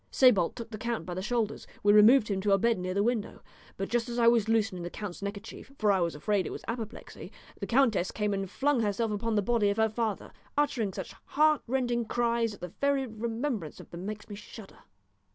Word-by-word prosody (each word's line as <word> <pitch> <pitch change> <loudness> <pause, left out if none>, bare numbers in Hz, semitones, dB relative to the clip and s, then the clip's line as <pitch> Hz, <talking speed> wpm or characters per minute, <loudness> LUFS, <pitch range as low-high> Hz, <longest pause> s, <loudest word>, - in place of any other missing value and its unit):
Sébalt 230 -10 +4
took 230 -1 -8
the 215 - -6
count 230 -6 -3
by 180 - -5
the 185 - -3
shoulders; 225 +1 -2 0.2
we 205 0 +5
removed 215 +3 +7
him 195 -2 -1
to 200 0 +2
a - - +5
bed 230 0 +2
near 185 +1 -3
the 200 - +2
window; 230 -2 -2 0.3
but 195 - -2
just 240 +1 -1
as 240 - -4
I 235 -1 +4
was 230 -2 +4
loosening 220 -5 +1
the 175 - -4
count's 200 -1 -7
neckerchief 200 +6 -7
for 210 -1 +3
I 195 - +3
was 170 -2 0
afraid 200 +5 0
it - - -5
was - - -7
apoplexy 230 -2 -6 0.3
the - - -4
countess 230 -8 +3
came 210 -1 -1
and 195 -1 -3
flung 280 +5 +1
herself 220 +1 0
upon 215 +2 -1
the 205 - +2
body 225 -1 +2
of 200 - -1
her 220 0 +3
father, 220 -2 -3 0.3
uttering 260 -8 +1
such - - -7
heartrending 260 -5 +1
cries 235 -1 0
that - - -13
the 180 -1 -7
very 280 -1 +2
remembrance 225 - -4
of - - -13
them 175 +3 -6
makes 215 0 -6
me 210 - -8
shudder." 205 0 -11
220 Hz, 225 wpm, -29 LUFS, 200-235 Hz, 0.3 s, removed